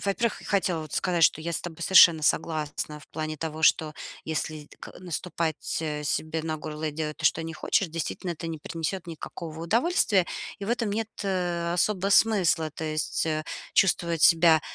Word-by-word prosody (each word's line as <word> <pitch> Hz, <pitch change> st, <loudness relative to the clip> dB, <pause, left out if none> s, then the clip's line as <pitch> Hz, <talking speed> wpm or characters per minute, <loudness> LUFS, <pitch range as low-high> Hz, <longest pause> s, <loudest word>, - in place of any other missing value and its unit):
во-первых, 210 Hz, +3 st, 0 dB
х -, -, -13 dB
хотела 185 Hz, -5 st, 0 dB
вот 155 Hz, -, -11 dB
сказать, 170 Hz, -3 st, +2 dB
что 155 Hz, -, +3 dB
я 170 Hz, +2 st, -4 dB
с -, -, -1 dB
тобой 170 Hz, -1 st, -8 dB
совершенно 170 Hz, -3 st, +7 dB
согласна 150 Hz, -1 st, -1 dB
в -, -, -18 dB
плане 155 Hz, 0 st, -4 dB
того, 160 Hz, +1 st, -5 dB
что 155 Hz, 0 st, +3 dB, 0.3 s
если 155 Hz, -1 st, -4 dB
ка -, -, -10 dB
наступать, 170 Hz, -3 st, -3 dB
э, 150 Hz, -2 st, -3 dB
себе 155 Hz, +2 st, -1 dB
на 155 Hz, -1 st, -2 dB
горло 155 Hz, 0 st, -6 dB
и 155 Hz, -, 0 dB
делать 155 Hz, 0 st, -4 dB
то, -, -, -9 dB
что 165 Hz, -, +3 dB
не 165 Hz, 0 st, -6 dB
хочешь, 190 Hz, +2 st, 0 dB
действительно, 165 Hz, +2 st, -4 dB
это 165 Hz, 0 st, -7 dB
не 165 Hz, -1 st, -5 dB
принесёт 165 Hz, +4 st, -4 dB
никакого 160 Hz, 0 st, -8 dB
удовольствия, 220 Hz, -, +2 dB, 0.3 s
и 200 Hz, -, -6 dB
в 200 Hz, -, -6 dB
этом 235 Hz, -3 st, 0 dB
нет, 220 Hz, +2 st, -2 dB, 0.2 s
э, 175 Hz, -3 st, -1 dB
особого 195 Hz, +2 st, +1 dB
смысла. 185 Hz, -7 st, +3 dB
То 160 Hz, -, -7 dB
есть, 155 Hz, 0 st, -1 dB
э, 155 Hz, -1 st, -1 dB, 0.3 s
чувствовать 170 Hz, -3 st, +2 dB
себя 165 Hz, -1 st, +6 dB
165 Hz, 185 wpm, -26 LUFS, 155-180 Hz, 0.3 s, совершенно